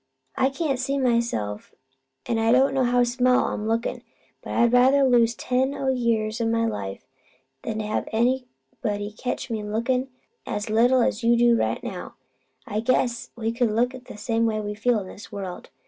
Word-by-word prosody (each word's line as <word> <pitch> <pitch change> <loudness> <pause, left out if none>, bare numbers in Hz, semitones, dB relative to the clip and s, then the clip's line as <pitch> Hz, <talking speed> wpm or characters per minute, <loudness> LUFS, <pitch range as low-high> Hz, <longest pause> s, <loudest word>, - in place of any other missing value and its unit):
I 265 - +2
can't 275 -2 -2
see 275 +2 -1
myself, 235 - -1 0.5
an' 230 - 0
I 225 0 +3
don't 265 +2 +4
know 265 -2 +2
how 245 0 +3
small 250 +1 +2
I'm 215 - -4
lookin'; 230 +1 -1 0.4
but - - -6
I'd 235 0 +3
rather 260 +3 +5
lose 235 -3 +4
ten 255 +4 0 0.2
year 230 -3 +1
o' - - +1
my 230 0 +1
life 100 - -4 0.6
'an 220 -1 -3
to 215 - -3
have 215 - -2
anybody 235 -3 -2
catch 250 +1 -4
me 220 -1 -2
lookin' 235 +5 -1 0.4
as 210 +1 -4
little 245 +3 +4
as 225 +1 -1
you 235 +1 +4
do 240 0 +5
right - - -1
now. - - -6 0.5
I 210 -1 -2
guess 235 0 0
we 225 -1 -2
look 235 +1 +1
about 255 -1 -11
the 225 +1 -1
way 225 -2 +1
we 210 -1 -4
feel 225 +1 +1
in 190 - -8
this 205 - -11
world. 195 -4 -7
235 Hz, 180 wpm, -24 LUFS, 220-250 Hz, 0.6 s, rather